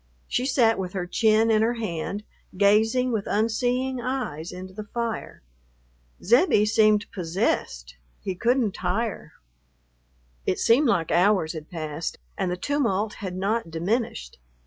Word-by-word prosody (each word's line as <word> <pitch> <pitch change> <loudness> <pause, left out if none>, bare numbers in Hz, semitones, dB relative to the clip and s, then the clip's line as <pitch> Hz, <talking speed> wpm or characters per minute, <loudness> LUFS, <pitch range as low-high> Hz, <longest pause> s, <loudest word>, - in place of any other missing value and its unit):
She 255 - 0
sat 235 -5 +3
with 185 -1 -4
her 185 -3 -2
chin 220 +4 +3
in 215 -1 +4
her 235 +2 +1
hand, 205 -1 -4 0.3
gazing 220 +5 +3
with 215 -4 -2
unseeing 245 +4 0
eyes 235 - -3
into 185 +1 -9
the 210 +2 -7
fire. 230 - -4 0.8
Zebbie 235 - +4
seemed 215 -1 +3
possessed; 165 - -2 0.2
he 190 - -3
couldn't 235 +1 +1
tire. 195 +5 -3 1.1
It - - +1
seemed 260 +6 +4
like 170 -8 +1
hours 180 -3 +3
had 155 -1 -8
passed 155 -1 -4 0.2
and 190 -2 -1
the 180 - -2
tumult 220 -4 0
had 185 -2 -4
not 200 +1 -1
diminished. 165 - -2
210 Hz, 135 wpm, -25 LUFS, 180-230 Hz, 1.1 s, in